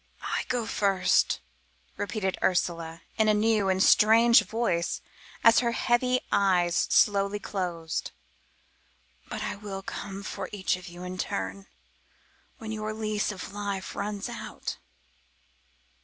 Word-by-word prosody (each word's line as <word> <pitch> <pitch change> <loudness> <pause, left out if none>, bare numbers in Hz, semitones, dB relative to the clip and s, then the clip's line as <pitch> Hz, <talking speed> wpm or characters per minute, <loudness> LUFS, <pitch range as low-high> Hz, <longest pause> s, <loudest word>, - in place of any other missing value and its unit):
"I - - -1
go 245 -2 -1
first," 195 - +2 0.5
repeated 200 -2 -2
Ursula 170 -2 0 0.2
in 220 - +4
a 210 - +4
new 210 -2 +2
and 190 0 +3
strange 230 +2 +6
voice 220 -7 -1 0.4
as 230 0 +7
her 235 -1 0
heavy 250 +2 +2
eyes 180 -3 +3
slowly 200 0 +3
closed, 175 -5 -3 1.2
"but - - -4
I - - -3
will 200 -2 -6
come 195 0 -6
for 195 -2 -5
each 195 -3 0
of 180 +1 -10
you 175 +1 -9
in 180 0 -6
turn, 95 - -3 0.9
when 220 -1 -7
your 215 0 -3
lease 215 -1 -1
of 190 -1 -8
life 200 -2 -4
runs 205 0 -3
out. - - -6
200 Hz, 125 wpm, -28 LUFS, 180-215 Hz, 1.2 s, as